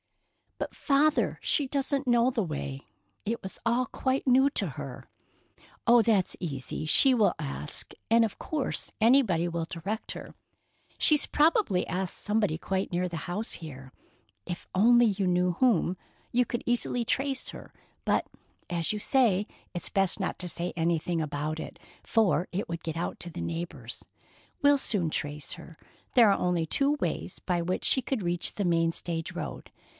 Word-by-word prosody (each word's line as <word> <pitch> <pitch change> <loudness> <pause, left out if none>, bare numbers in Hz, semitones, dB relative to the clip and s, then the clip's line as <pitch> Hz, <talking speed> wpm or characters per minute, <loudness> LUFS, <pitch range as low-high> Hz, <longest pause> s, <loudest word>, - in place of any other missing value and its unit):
"But, - - -5
Father, 295 +1 +2
she 285 - +1
doesn't 275 0 -1
know 240 +1 +4
the 230 -4 0
way. 140 -4 -5 0.4
It 230 +2 -2
was 190 - -7
all 240 +2 +2
quite 265 +3 -1
new 265 +2 +5
to - - 0
her." - - -8 0.8
"Oh, 240 0 +7
that's 210 -4 +2
easy. 150 -2 -4
She 265 - +6
will 220 -4 +3
ask, 150 -1 -2 0.2
and 230 0 +6
of 215 - -6
course 300 -4 -2
anybody 220 -8 +4
will 170 -1 -2
direct 195 +7 -5
her. - - -9 0.6
She's 300 -2 +5
probably 305 - +3
asked 185 +1 -3
somebody 210 -6 0
quite 190 +3 -2
near 180 +1 0
the 165 -2 -5
house 210 +6 -3
here. 135 -5 -9 0.5
If 175 - -6
you 185 - +3
only 240 -2 +5
knew 180 -1 +2
whom, 190 -5 +2 0.3
you 245 +1 +3
could 240 -1 -4
easily 240 0 0
trace 270 +3 -1
her, - - -10 0.3
but, - - +1 0.4
as 170 +2 0
you - - -2
say, 210 -5 +3 0.3
it's 175 -3 -3
best 195 -1 +1
not 190 - -2
to 180 - -2
say 170 +2 -2
anything 165 0 0
about 150 +1 -3
it, - - -8 0.2
for 210 -5 +2
it 190 +3 -2
would 170 0 -5
get 165 -1 -4
out 170 - -3
to 175 - -6
the - - -7
neighbors. 165 -8 -5 0.6
We'll 285 -1 +5
soon 180 -11 0
trace 145 -1 -3
her. 165 -1 -12 0.4
There 235 -4 +7
are 195 - +2
only 175 -2 +1
two 280 - +2
ways 175 +1 -3
by 180 -2 -1
which 180 +2 -2
she 260 - +4
could 255 -5 -2
reach 175 0 -1
the 200 - -1
main 165 -1 +2
stage 165 -1 -4
road. - - -6
185 Hz, 170 wpm, -28 LUFS, 170-240 Hz, 0.8 s, Oh